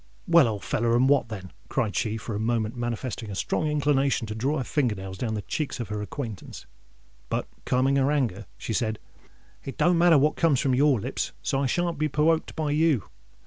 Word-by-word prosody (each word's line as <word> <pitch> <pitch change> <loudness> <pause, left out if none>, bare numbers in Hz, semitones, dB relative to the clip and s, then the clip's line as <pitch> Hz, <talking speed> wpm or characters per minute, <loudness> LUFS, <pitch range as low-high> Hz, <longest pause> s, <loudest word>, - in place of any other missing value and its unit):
"Well, 170 -6 +6
old 105 -3 -3
feller—and 120 -1 +2
what 140 -5 +3
then?" 95 -4 -7 0.2
cried 115 -6 -1
she, 110 0 0
for 110 +1 -6
a 105 - -2
moment 115 0 0
manifesting 120 -1 -4
a 100 - -5
strong 155 +9 -1
inclination 140 -4 +1
to 110 - -5
draw 135 +8 -1
her 130 - -1
finger 125 -6 0
nails 95 0 -7
down 110 +2 -2
the 105 - -4
cheeks 145 - -3
of 115 -4 -4
her 105 0 -3
acquaintance: 110 - -7 0.6
but, - - -2 0.2
calming 130 +2 +2
her 135 0 +3
anger, 115 -8 -1
she 115 - -4
said, 110 -2 0 0.7
"It 135 - -7
don't 175 -1 +3
matter 170 -2 +6
what 150 +2 +3
comes 155 -6 +3
from 135 - +1
your 135 -1 +4
lips—so 135 +4 -3
I 140 - +1
shan't 170 +1 -1
be 155 - +2
perwoked 155 +2 +1
by 155 -2 -1
you. 150 - +2
130 Hz, 200 wpm, -26 LUFS, 110-150 Hz, 0.7 s, Well